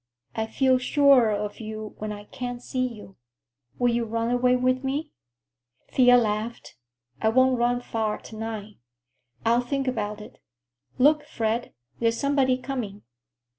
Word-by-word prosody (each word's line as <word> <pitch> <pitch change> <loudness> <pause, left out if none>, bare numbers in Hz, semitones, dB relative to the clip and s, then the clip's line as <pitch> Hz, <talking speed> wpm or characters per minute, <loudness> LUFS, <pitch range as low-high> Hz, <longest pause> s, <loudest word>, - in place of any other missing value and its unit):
I 220 0 -1
feel 260 +2 +2
surer 275 -3 +5
of 210 0 -3
you 215 -1 -6
when 215 0 -4
I 205 0 -7
can't 245 +3 -6
see 255 -1 -1
you. 210 -5 -11 0.6
Will 245 -1 +2
you 235 0 0
run 230 +1 -1
away 250 0 +3
with 255 +1 +1
me?" 290 +3 -2 0.8
Thea 245 -1 +6
laughed. 220 0 -2 0.5
"I 220 - +3
won't 260 +1 +3
run 245 +1 +1
far 220 -3 -2
to 220 - -12
night. 215 -2 -6 0.7
I'll 235 +2 +4
think 270 +2 -2
about 210 -4 -2
it. 210 - -12 0.6
Look, 295 +3 +4
Fred, 230 +1 -2 0.2
there's 230 0 +1
somebody 275 -2 +2
coming." 245 -6 -5
240 Hz, 145 wpm, -25 LUFS, 220-255 Hz, 0.8 s, Thea